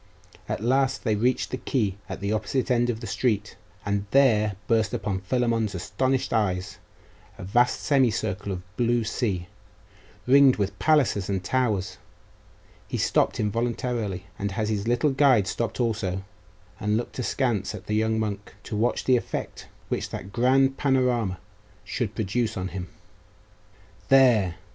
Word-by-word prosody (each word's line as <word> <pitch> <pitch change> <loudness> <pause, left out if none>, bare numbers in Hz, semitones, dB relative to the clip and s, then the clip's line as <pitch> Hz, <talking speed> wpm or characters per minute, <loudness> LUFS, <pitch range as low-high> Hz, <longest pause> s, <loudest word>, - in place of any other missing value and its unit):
At - - -3
last 130 +2 +1
they 110 - +1
reached 125 +5 0
the 130 - -2
quay 105 -9 -1
at - - -6
the 100 +2 -1
opposite 115 +4 -1
end 120 0 +2
of 115 -1 -2
the - - -5
street; 105 -4 -1 0.3
and 100 0 -1
there 110 -6 +4
burst 110 -3 +2
on 95 -2 -2
Philammon's 115 -1 0
astonished 130 +10 -1
eyes 95 -5 -1 0.6
a 95 - -8
vast 120 +7 +2
semicircle 115 -7 +1
of 90 +1 -8
blue 120 -1 +2
sea, 105 -5 -2 0.8
ringed 135 0 +6
with 100 -2 -3
palaces 115 -7 +2
and 95 -2 -1
towers....He 110 -7 -5
stopped - - +1
involuntarily; 115 -2 -2 0.2
and 100 -1 -2
his 105 0 -1
little 120 +5 +2
guide 130 -6 +4
stopped 115 +6 -3
also, 100 -6 -1 0.6
and 105 +1 +1
looked 120 - -5
askance 120 -4 -1
at - - -10
the 105 - -3
young 110 +1 +1
monk, 105 -1 -4
to - - -5
watch 115 +4 0
the 130 -1 +4
effect - - -5 0.2
which - - -2
that 95 +2 -7
grand 135 +2 +3
panorama 125 -8 +1 0.5
should - - -3
produce 110 +2 -1
on 95 0 -3
him. 90 -2 -6 1.2
'There! 120 -10 +5
110 Hz, 145 wpm, -25 LUFS, 100-125 Hz, 1.2 s, ringed